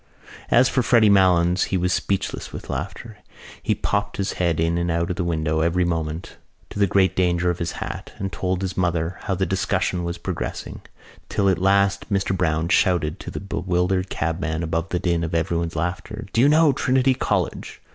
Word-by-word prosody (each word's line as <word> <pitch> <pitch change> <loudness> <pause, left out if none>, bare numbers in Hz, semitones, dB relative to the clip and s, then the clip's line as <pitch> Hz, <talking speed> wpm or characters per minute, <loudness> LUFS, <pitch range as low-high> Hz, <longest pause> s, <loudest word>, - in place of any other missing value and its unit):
As 125 +2 +5
for 130 - +1
Freddy 115 -3 +5
Malins 90 -2 +4
he 95 - -1
was 90 0 +1
speechless 100 0 -2
with - - -7
laughter. - - -6 0.4
He - - 0
popped 100 0 -2
his 100 - -1
head 85 -3 +1
in 85 +1 +1
and 85 0 -1
out 85 +1 0
of - - -2
the 90 - -2
window 80 -2 0
every 85 +2 +2
moment 80 0 -3 0.3
to - - -6
the 100 - +4
great 95 0 +2
danger 90 -1 +2
of 85 - -6
his 85 -1 -2
hat, - - -6
and 95 -1 -4
told 95 0 -1
his 95 -1 -3
mother 85 -1 -1
how 95 - 0
the 95 +1 0
discussion 90 -1 -1
was 85 0 -3
progressing, - - -5 0.5
till 100 -2 +1
at 90 -3 +1
last 100 +2 +2
Mr 95 -1 +1
Browne 80 -3 0
shouted 90 -4 +2
to - - -7
the - - -5
bewildered 90 -1 -1
cabman 80 0 -2
above 80 +2 -2
the 90 - 0
din 85 -1 0
of 85 0 -2
everybody's 85 0 -1
laughter: 90 +7 -3
"Do 115 - +3
you 140 - +6
know 155 -1 +5
Trinity 130 0 +2
College?" - - -2
90 Hz, 195 wpm, -23 LUFS, 85-100 Hz, 0.5 s, you